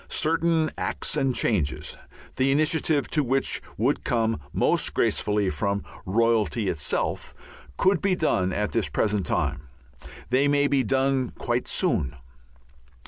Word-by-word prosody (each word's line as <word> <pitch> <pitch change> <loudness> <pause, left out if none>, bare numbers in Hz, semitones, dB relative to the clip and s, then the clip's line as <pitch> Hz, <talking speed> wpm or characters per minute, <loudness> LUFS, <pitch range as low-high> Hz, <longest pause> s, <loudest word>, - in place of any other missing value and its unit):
Certain 165 0 +1
acts - - -2
and 135 -2 +1
changes, 75 - -1 0.4
the 130 +1 +2
initiative 155 0 +1
to 150 - +1
which 135 +1 0 0.2
would - - +1
come 115 -4 0
most - - +1
gracefully 105 -1 +1
from 100 +7 -1 0.2
royalty 115 0 +1
itself, 75 -3 -2 0.4
could 190 -2 +3
be 195 -2 +2
done 110 - +1
at 105 +3 -1
this 110 -10 0
present 105 +5 0
time. 75 0 -1 0.6
They 135 +3 +3
may 145 0 +3
be 140 -1 +2
done 130 +1 +1
quite 120 +1 -1
soon. 95 - 0
125 Hz, 130 wpm, -25 LUFS, 105-145 Hz, 0.6 s, could